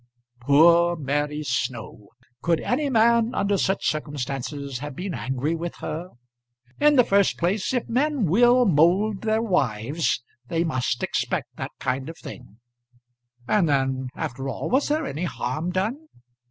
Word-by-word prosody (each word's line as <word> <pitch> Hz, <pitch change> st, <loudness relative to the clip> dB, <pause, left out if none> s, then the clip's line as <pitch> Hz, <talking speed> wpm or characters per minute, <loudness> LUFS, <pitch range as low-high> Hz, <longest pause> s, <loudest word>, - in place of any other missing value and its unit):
Poor 170 Hz, +6 st, +5 dB
Mary 145 Hz, 0 st, -2 dB
Snow! 120 Hz, -5 st, -3 dB, 0.3 s
Could 170 Hz, -1 st, +1 dB
any 280 Hz, +4 st, 0 dB
man 235 Hz, 0 st, +3 dB
under 200 Hz, 0 st, +1 dB
such 195 Hz, 0 st, 0 dB
circumstances 140 Hz, -2 st, -3 dB
have 145 Hz, 0 st, -7 dB
been 185 Hz, +3 st, -4 dB
angry 135 Hz, +5 st, -2 dB
with 170 Hz, +1 st, -4 dB
her? 165 Hz, +4 st, -5 dB, 0.7 s
In 295 Hz, 0 st, +5 dB
the 250 Hz, -, +6 dB
first 200 Hz, -3 st, +2 dB
place 185 Hz, +4 st, 0 dB
if 250 Hz, -2 st, -1 dB
men 270 Hz, 0 st, +1 dB
will 240 Hz, +8 st, +4 dB
mould 190 Hz, +4 st, +3 dB
their 220 Hz, 0 st, +1 dB
wives, 140 Hz, -, 0 dB, 0.2 s
they 165 Hz, +3 st, 0 dB
must 130 Hz, -6 st, -1 dB
expect -, -, -2 dB
that -, -, -5 dB
kind 130 Hz, +3 st, -2 dB
of 165 Hz, -, -9 dB
thing; 105 Hz, -, -11 dB, 0.9 s
and 195 Hz, -7 st, +2 dB
then, 135 Hz, -2 st, 0 dB
after 135 Hz, -3 st, -4 dB
all, -, -, -4 dB
was 265 Hz, +3 st, +2 dB
there 305 Hz, +1 st, 0 dB
any 155 Hz, +6 st, -3 dB
harm 135 Hz, +4 st, -3 dB
done? 220 Hz, -, -2 dB
165 Hz, 145 wpm, -24 LUFS, 140-215 Hz, 0.9 s, the